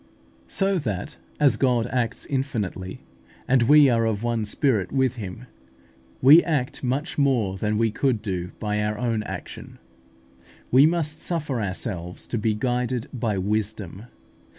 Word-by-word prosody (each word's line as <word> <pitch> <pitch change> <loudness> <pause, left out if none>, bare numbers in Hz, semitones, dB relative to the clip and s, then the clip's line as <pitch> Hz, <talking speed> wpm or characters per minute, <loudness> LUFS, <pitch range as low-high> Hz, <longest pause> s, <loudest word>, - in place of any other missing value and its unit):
So 195 -1 +1
that, 105 - -4 0.2
as 140 -6 +4
God 125 -3 +2
acts 125 -3 -1
infinitely, 105 - -3 0.4
and 130 -1 +4
we 145 +4 +7
are 115 -3 +2
of 110 -1 -2
one 115 -2 0
spirit 105 - 0
with 130 -2 +1
Him, 105 +3 -7 0.8
we 150 +6 +9
act 145 -7 -2
much 135 +6 -2
more 120 -9 +2
than 105 +2 -1
we 115 0 +2
could 120 -2 0
do 90 -4 -3
by 105 -1 -1
our 105 0 -1
own 115 -2 -1
action. 105 - -8 0.9
We 135 +4 +7
must 160 -2 -1
suffer 150 -8 -2
ourselves 90 -3 -5
to 120 - -1
be 110 0 +1
guided 125 +1 -1
by 110 -5 -1
Wisdom. 105 0 -3
115 Hz, 145 wpm, -24 LUFS, 105-135 Hz, 0.9 s, we